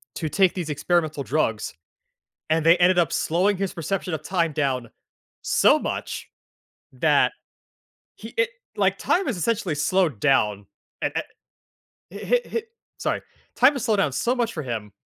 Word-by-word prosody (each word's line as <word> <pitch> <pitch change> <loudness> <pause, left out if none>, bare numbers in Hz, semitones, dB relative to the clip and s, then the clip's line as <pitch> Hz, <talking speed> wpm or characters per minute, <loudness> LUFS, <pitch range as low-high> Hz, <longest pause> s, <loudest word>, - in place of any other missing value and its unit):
to 160 - -3
take 190 +3 +3
these 175 -4 -4
experimental 155 -1 0
drugs, 120 -6 -1 0.8
and 160 0 +2
they 165 +2 +6
ended 180 +1 +4
up 170 - +2
slowing 185 +5 +1
his 195 0 -2
perception 180 +1 -3
of 155 - -3
time 170 -1 0
down 130 -5 -1 0.5
so - - +4
much - - -4 0.6
that 145 +2 +3 0.8
he - - -10
it 485 0 +3 0.3
like, - - +2
time 375 -4 +1
is 225 - -2
essentially 205 -2 0
slowed 155 - +1
down 105 -7 +2 0.4
and - - -1 0.8
and - - -14
hi - - +2
hi 460 - -2 0.4
sorry, - - -1 0.4
time 275 +3 +5
slowed 220 -1 +1
down 155 -8 +2
so 235 - 0
much 240 -3 0
for 155 - -4
him, 110 -5 -5
165 Hz, 150 wpm, -24 LUFS, 145-195 Hz, 0.8 s, they